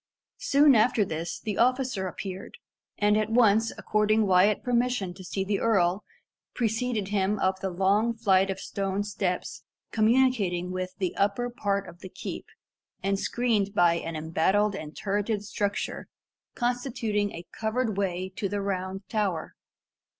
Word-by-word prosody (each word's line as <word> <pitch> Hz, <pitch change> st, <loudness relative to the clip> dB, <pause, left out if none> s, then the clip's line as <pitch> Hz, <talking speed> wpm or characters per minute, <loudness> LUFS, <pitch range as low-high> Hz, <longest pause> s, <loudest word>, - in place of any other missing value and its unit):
Soon 295 Hz, -, +5 dB
after 220 Hz, -2 st, +3 dB
this, 165 Hz, 0 st, -4 dB
the 215 Hz, -2 st, -4 dB
officer 250 Hz, -5 st, +1 dB
appeared, 190 Hz, +1 st, -7 dB, 0.4 s
and 210 Hz, 0 st, +3 dB
at 215 Hz, 0 st, +1 dB
once 225 Hz, -1 st, +4 dB
according 215 Hz, 0 st, +2 dB
Wyat 190 Hz, +2 st, +4 dB
permission 245 Hz, -6 st, 0 dB
to 185 Hz, -, -11 dB
see 190 Hz, +2 st, -2 dB
the 200 Hz, +1 st, -1 dB
earl, 195 Hz, -3 st, +2 dB, 0.5 s
preceded 225 Hz, -3 st, -1 dB
him 200 Hz, 0 st, +1 dB
up 190 Hz, -1 st, 0 dB
the 190 Hz, -, -2 dB
long 200 Hz, +6 st, +2 dB
flight 195 Hz, -4 st, +3 dB
of 190 Hz, 0 st, -3 dB
stone 195 Hz, 0 st, -2 dB
steps 195 Hz, -3 st, -3 dB, 0.3 s
communicating 215 Hz, -6 st, +2 dB
with 185 Hz, 0 st, -4 dB
the 185 Hz, -3 st, -2 dB
upper 205 Hz, +5 st, 0 dB
part 200 Hz, -4 st, -1 dB
of 175 Hz, 0 st, -12 dB
the 190 Hz, -, -9 dB
keep, -, -, -7 dB, 0.6 s
and 195 Hz, 0 st, 0 dB
screened 215 Hz, -5 st, 0 dB
by 175 Hz, -3 st, +5 dB
an 165 Hz, -1 st, -4 dB
embattled 170 Hz, +7 st, +1 dB
and 155 Hz, -5 st, -7 dB
turreted 205 Hz, +1 st, -1 dB
structure, 205 Hz, -1 st, -3 dB, 0.5 s
constituting 240 Hz, -4 st, -1 dB
a 170 Hz, +1 st, -8 dB
covered 220 Hz, 0 st, -1 dB
way 190 Hz, -1 st, -2 dB
to 200 Hz, -, -1 dB
the 205 Hz, +1 st, -2 dB
Round 195 Hz, 0 st, -3 dB
Tower. 200 Hz, -7 st, -2 dB
200 Hz, 145 wpm, -27 LUFS, 190-225 Hz, 0.6 s, Soon